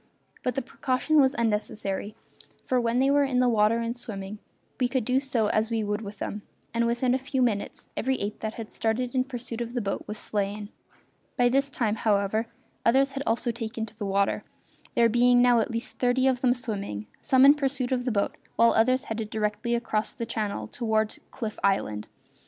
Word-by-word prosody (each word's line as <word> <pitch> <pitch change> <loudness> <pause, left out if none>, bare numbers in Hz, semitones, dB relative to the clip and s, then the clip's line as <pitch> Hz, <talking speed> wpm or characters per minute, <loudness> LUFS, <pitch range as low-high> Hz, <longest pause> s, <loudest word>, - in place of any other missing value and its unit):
But 250 -2 -1
the 270 - -1
precaution 265 +4 +2
was 265 +1 +3
unnecessary, 210 -2 -2 0.5
for 255 -1 +2
when 235 0 +1
they 270 +2 +4
were 285 0 +4
in 270 -2 0
the 250 - +4
water 220 -1 +3
and 230 0 -2
swimming 210 -4 -6 0.4
we 250 - +3
could 250 -3 -1
do 255 +2 +3 0.3
as 215 +1 +1
we 225 -2 0
would 210 +1 -2
with 205 -1 -8
them, 205 +1 -4 0.3
and 235 0 +2
within 240 +2 +1
a 260 - +1
few 265 0 0
minutes 215 -5 -1
every 265 +2 0
ape 205 +1 -4
that 220 0 -4
had 225 -2 -7
started 240 +2 -1
in 255 -1 +2
pursuit 245 -3 -5
of 235 +1 -5
the - - +1
boat 200 -2 -2
was 210 - -5
slain. 205 0 -3 0.7
By 245 0 +4
this 275 +2 +2
time, 225 -5 -1
however, 215 +1 +1 0.4
others 270 +4 +4
had 275 0 -4
also 235 +2 +1
taken 225 0 -4
to 220 - -15
the 205 - -2
water, 195 0 +1 0.5
there 235 - +5
being 245 +2 +4
now 245 -1 +5
at 225 - 0
least 230 0 -5
thirty 250 +1 +2
of 260 -2 +2
them 250 -1 +3
swimming, 200 - -4 0.2
some 260 0 +5
in 280 - +9
pursuit 270 -3 -1
of 250 -1 +1
the 250 - +1
boat 200 -2 0 0.2
while 230 0 +5
others 255 +4 +3
headed 220 -1 -4
directly 215 +2 -1
across 220 -2 -1
the 235 - -4
channel 210 - -2
toward 220 - -1
Cliff 220 -4 -5
Island. 105 - +1
230 Hz, 200 wpm, -27 LUFS, 215-255 Hz, 0.7 s, in